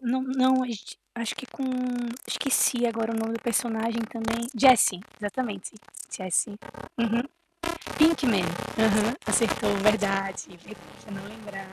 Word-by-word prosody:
Não 260 +1 0
não, 260 0 +3 0.6
acho 230 -2 -3
que 260 - -8
com 270 - -6 0.6
esqueci 250 -3 +2
agora 225 -1 -1
o 225 - -1
nome 225 +1 -2
do 230 - -4
personagem 230 -1 0
também, 230 +1 -3
Jessie, 230 -7 +6 0.2
exatamente. 205 -1 -4 0.4
Jesse. 190 +3 -1 0.4
Uhum. 235 0 +2 0.7
Pinkman, 290 - +4
uhum. 215 +5 +1
Acertou, 230 -3 +2
verdade. 195 -3 0 0.5
Eu 210 - -10
não 195 0 -7
lembrava. 205 -3 -10
225 Hz, 120 wpm, -27 LUFS, 205-240 Hz, 0.7 s, Jessie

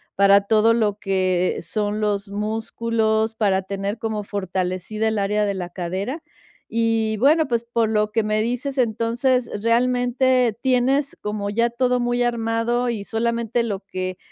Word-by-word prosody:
para 200 0 +6
todo 220 +2 +3
lo 210 -3 0
que 185 -2 0
son 210 +4 -2
los 205 -1 -1
músculos, 220 +1 -1
para 195 -4 +1
tener 200 +2 -3
como 220 -2 -3
fortalecida 190 +2 -2
el 220 -1 0
área 210 +1 +1
de 200 - -1
la 180 -2 -4
cadera. 190 - -4 0.5
Y, 225 -1 0
bueno, 305 +7 +4
pues, 235 -2 0
por 230 -1 0
lo 210 -1 +1
que 225 0 +1
me 215 0 0
dices, 250 +4 -2
entonces, 235 +1 +1
realmente 245 0 +2
tienes 265 +2 +1
como 210 -1 -3
ya 230 +3 +1
todo 250 +1 +1
muy 245 0 0
armado 235 +1 0
y 220 -4 -3
solamente 235 +1 -1
lo 205 -4 -3
que 185 -1 -5
220 Hz, 150 wpm, -22 LUFS, 200-235 Hz, 0.5 s, para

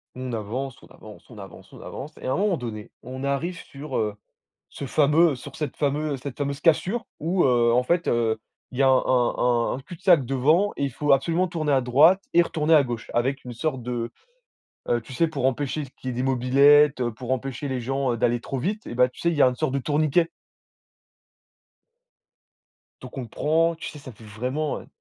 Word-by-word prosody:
On 130 -1 -5
avance, 120 +5 -4
on - - -16
avance, 105 +3 -15
on 110 - -13
avance, 95 -1 -12
on - - -12
avance 145 +3 -8
et - - -5
à 130 - 0
un - - 0
moment 195 -3 +1
donné, 110 -4 -7
on 130 +2 -7
arrive 155 +6 -2
sur, 140 -1 -7
heu, 105 -1 -1 0.5
ce 140 - -8
fameux 150 +4 +3
sur 125 - -10
cette 150 -5 -4
fameu 145 0 -1
cette 135 0 -7
fameuse 140 0 -3
cassure, 190 +9 +2 0.2
où, 175 +4 +1
heu, 120 -2 +3
en 125 +1 +3
fait, 170 +6 0
heu, 115 -2 +1 0.3
il 130 - -9
y - - +4
a 135 - +5
un 130 - +6
un 120 -1 +1
un 130 - -5
cul-de-sac 170 -2 +2
devant 155 +10 +2
et 140 - -1
il 140 - -1
faut 145 +2 +1
absolument 165 +7 +2
tourner 155 -4 -1
à 135 - +4
droite 150 +10 +5
et 175 - +7
retourner 160 -1 +1
à 150 - +7
gauche 120 -3 -6
avec 130 +3 0
une 125 - -7
sorte 130 -1 -2
de, 120 -1 -3 0.8
heu, 120 - +2
tu 125 - -12
sais, 165 +6 +1
pour 145 -5 -4
empêcher 145 +3 -1
qu'il 130 - -6
y - - 0
ait - - -7
des 125 - -1
mobylettes, 135 +3 +4
heu, 120 -2 -1
pour 125 +3 -8
empêcher 135 +2 -3
les 130 -1 -2
gens, 135 +1 -1
heu, - - -3
d'aller 120 0 +1
trop 135 - -5
vite 205 - -3
et - - -6
bah, 125 +1 +4
tu 125 - -15
sais, 170 - +1
il 165 - -2
y 145 - +4
a - - +7
une 125 - -4
sorte 155 -2 -1
de - - +1
tourniquet 155 +4 +1 2.7
donc - - -10
on 130 - -2
le 120 - -7
prend. 165 +8 +1
Tu 160 - -7
sais, 150 - -11
ça 130 - -10
fait 110 0 -17
vraiment, 125 +8 -3
heu, - - -16
135 Hz, 225 wpm, -24 LUFS, 125-155 Hz, 2.7 s, et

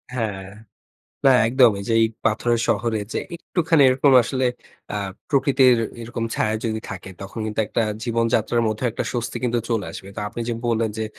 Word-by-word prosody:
হ্যাঁ। 100 -5 -3 0.8
না 135 - +7 0.2
একদম 125 -1 +6
এই 100 - -7
যে, - - +1
এই 110 - +5 0.2
পাথরের 115 +1 +1
শহরে 115 -2 +1
যে, - - -1 0.2
একটুখানি 165 -3 +1
এরকম 135 +2 +3
আসলে 130 +3 -1 0.5
আ - - -1 0.3
প্রকৃতির 135 -3 +4 0.3
এরকম 115 0 -4
ছায়া 110 0 0
যদি 110 -1 -1
থাকে 95 -1 -7
তখন 100 +4 -8
কিন্তু 110 +1 -2
একটা 115 - 0 0.2
জীবনযাত্রার 115 0 +1
মধ্যে 110 +4 -3
একটা - - -3
স্বস্তি 120 -1 -3
কিন্তু 120 -1 +1
চলে 115 -4 0
আসবে। 95 - -9
তো - - -3
আপনি 120 - -7
যে - - 0 0.2
বললেন 115 -1 +1
যে 110 - -1
115 Hz, 175 wpm, -22 LUFS, 110-125 Hz, 0.8 s, না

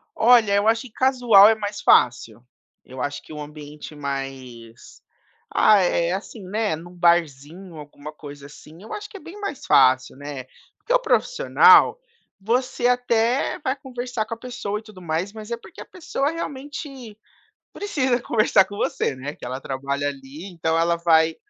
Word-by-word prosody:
Olha, 225 -3 +5
eu 205 +2 +2
acho 225 0 +3
que 245 - -12
casual 245 -6 +5
é 225 - +3
mais 205 -1 -5
fácil. 120 -2 +2 0.4
Eu 130 0 -9
acho 145 0 -3
que - - -15
o 150 - -8
ambiente 150 0 -10
mais, 135 -5 -8 0.5
ah, 215 -1 +5
é 175 -1 +1
assim, 200 +1 -7
né, 210 -3 -1
num 175 +3 -12
barzinho 170 0 0
alguma 150 0 -10
coisa 145 -2 -11
assim, 155 +4 -15
eu 220 - -9
acho 420 0 -7
que 400 - -10
é - - -12
bem 340 +6 -12
mais 400 -9 -6
fácil, 130 -1 +4
né, 140 -3 -7 0.3
porque - - -3
o - - +7
profissional, - - +4 0.4
você 245 +3 0
até 245 +3 +1
vai 265 -2 -2
conversar 250 -4 -5
com 230 - -6
a - - -19
pessoa 235 -4 -5
e - - -17
tudo 210 -4 -14
mais, 170 +5 -3
mas 215 +1 -10
é 235 - -2
porque 355 - -14
a - - -9
pessoa 310 -5 -3
realmente 275 -6 -7 0.6
precisa 265 -12 -1
conversar 215 -5 +3
com 205 - -10
você, 135 - -1
né, 140 +3 -6
que - - -12
ela 130 +2 -5
trabalha 140 +1 -3
ali 140 +5 -9
então 165 -1 -1
ela 170 +1 +2
vai 160 -1 +3
195 Hz, 175 wpm, -22 LUFS, 145-245 Hz, 0.6 s, o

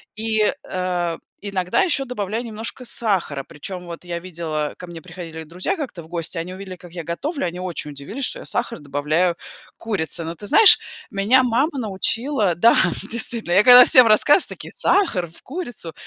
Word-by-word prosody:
И, 220 -1 +1 0.2
э, 180 -2 -2 0.2
иногда 190 - -1
еще 300 -7 +1
добавляю 225 -1 -4
немножко 230 +2 -5
сахара, 185 - 0
причем 180 +6 -8
вот 170 0 -9
я 170 -1 -4
видела, 160 -4 -4
ко 180 - -9
мне 170 -1 -9
приходили 165 -2 -9
друзья 180 - -3
как-то 255 - -6
в - - -15
гости, 170 0 -3
они 180 +3 -6
увидели 190 -1 -8
как 175 -1 -15
я 170 -2 -6
готовлю, 275 - -3
они 175 +1 -5
очень 175 -5 -4
удивились, 175 - -5
что - - -4
я - - -10
сахар 235 -5 -2
добавляю 150 +5 0
к - - -41 0.4
курице. 170 -6 -2
Но 165 +1 -5
ты 205 - -8
знаешь, 440 - +7 0.3
меня 220 +7 +3
мама 270 +5 0
научила 215 - 0
Да, 230 +7 +5 0.4
действительно, 225 -5 -1
я 200 +3 +5
когда 250 +1 +10
всем 255 -3 +7
рассказываю, 290 - +4
такие: - - -9
"Сахар 225 - +1
в 165 - -14
курицу?" 245 - -6
185 Hz, 180 wpm, -21 LUFS, 170-235 Hz, 0.4 s, когда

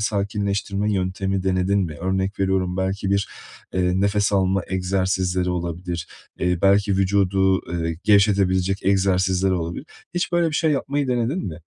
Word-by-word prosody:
sakinleştirme 100 0 -1
yöntemi 95 0 -1
denedin 95 +1 +1
mi? 85 -6 -2
Örnek 95 +2 -1
veriyorum, 95 -1 0
belki 95 +1 -2
bir, 100 0 +1 0.5
eee, 90 0 +1
nefes 100 +1 +1
alma 95 0 +2
egzersizleri 95 -1 0
olabilir, 85 0 -4 0.3
eee, 90 -1 0
belki 100 +1 +4
vücudu, 95 -1 +2
ııı, 85 -1 -2
gevşetebilecek 95 -2 +3
egzersizler 95 -1 +2
olabilir. 85 - -3 0.3
Hiç 175 0 -1
böyle 175 -1 +3
bir - - -6
şey 160 +1 +2
yapmayı 140 0 -1
denedin 125 +8 -1
mi? 85 -2 -7
95 Hz, 140 wpm, -22 LUFS, 90-100 Hz, 0.5 s, belki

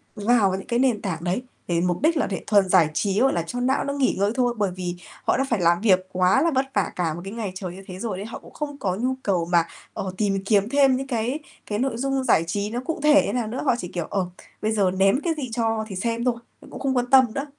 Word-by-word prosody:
vào 210 -2 +3
những 190 - -7
cái 235 0 0
nền 245 -5 +2
tảng 170 -4 -4
đấy 185 +7 -1 0.3
để 170 -1 +1
mục 175 +3 0
đích 320 +1 +3
là - - +1
để 190 - -4
thuần 200 -3 +4
giải 175 -5 +5
trí, 200 +5 0
gọi 270 - +4
là, 170 - 0
cho 245 +9 -5
não 260 +2 +1
nó 280 - -2
nghỉ 280 -2 +1
ngơi 200 +1 +2
thôi. 245 -2 +2
Bởi 205 -3 0
vì 180 -1 -4 0.3
họ - - +2
đã 270 - +2
phải 230 -6 +1
làm 170 +2 +3
việc 185 -4 +3
quá 185 +7 +3
là 335 - +2
vất 265 - +2
vả 200 - 0
cả 165 -3 -1
một 170 - -7
cái 195 - -6
ngày 220 -5 -4
trời 185 -2 -5
như 195 - -11
thế 185 0 -8
rồi 210 -5 -3
đấy, 200 - -5
họ 225 - -7
cũng - - -16
không 290 -2 -5
có 185 -7 -1
nhu 255 +5 -1
cầu 180 -4 +1
mà, 170 -1 +5 0.3
ờ, 190 - -4
tìm 195 -2 0
kiếm 205 0 +2
thêm 275 -2 +4
những 270 +1 -5
cái 245 +3 -1 0.3
cái 210 0 -3
nội 260 -3 -1
dung 270 +1 -1
giải 165 - +3
trí 200 +4 -2
nó 240 +3 -3
cụ 325 - -3
thể 300 -1 +6
như - - -2
nào 240 -3 -1
nữa, 235 +4 -4
họ 250 - +3
chỉ, 180 - -4
kiểu, 175 -3 -2
ờ, 195 -2 0 0.4
bây 215 +1 0
giờ 200 -4 +2
ném 195 +6 +3
cái 335 - +1
gì 260 -4 -4
cho 225 -2 0
thì 195 - -7
xem 230 +4 -2
thôi, 245 -2 +2 0.4
cũng - - -8
không 265 -1 0
quan 245 0 0
tâm 265 -1 +8
nữa. 275 +1 -2
215 Hz, 285 wpm, -24 LUFS, 185-255 Hz, 0.4 s, tâm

